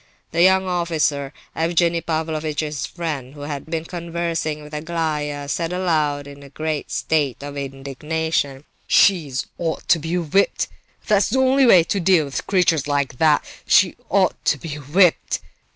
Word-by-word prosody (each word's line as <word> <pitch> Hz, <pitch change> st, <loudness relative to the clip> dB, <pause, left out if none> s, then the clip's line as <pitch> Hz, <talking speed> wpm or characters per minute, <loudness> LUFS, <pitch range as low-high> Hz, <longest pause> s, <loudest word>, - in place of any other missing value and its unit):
The 170 Hz, -, +1 dB
young 190 Hz, +1 st, +5 dB
officer, 160 Hz, -6 st, 0 dB, 0.2 s
Evgenie 170 Hz, +1 st, +1 dB
Pavlovitch's 155 Hz, -2 st, -2 dB
friend 150 Hz, -6 st, -5 dB
who 145 Hz, -, -10 dB
had 145 Hz, 0 st, -5 dB
been 160 Hz, 0 st, -3 dB
conversing 170 Hz, -3 st, -3 dB
with 150 Hz, +1 st, -13 dB
Aglaya, 150 Hz, -2 st, -2 dB
said 165 Hz, +3 st, -2 dB
aloud 155 Hz, -6 st, 0 dB
in 140 Hz, 0 st, -11 dB
a 140 Hz, -, -12 dB
great 155 Hz, +1 st, -3 dB
state 145 Hz, -4 st, -1 dB
of 145 Hz, 0 st, -7 dB
indignation: 140 Hz, +1 st, -3 dB, 0.2 s
"She 170 Hz, -8 st, +4 dB, 0.3 s
ought 165 Hz, -2 st, -3 dB
to 165 Hz, -, +5 dB
be 165 Hz, +3 st, -2 dB
whipped—that's 195 Hz, +3 st, 0 dB
the 265 Hz, -, 0 dB
only 265 Hz, 0 st, +4 dB
way 180 Hz, -7 st, +7 dB
to 195 Hz, -, -1 dB
deal 175 Hz, -3 st, +3 dB
with 140 Hz, -, -5 dB
creatures 165 Hz, -7 st, +2 dB
like 140 Hz, -4 st, -1 dB
that—she 155 Hz, -3 st, +3 dB
ought -, -, +1 dB
to -, -, +3 dB
be 165 Hz, -3 st, -7 dB
whipped!" 160 Hz, +5 st, +2 dB
160 Hz, 145 wpm, -21 LUFS, 145-170 Hz, 0.3 s, way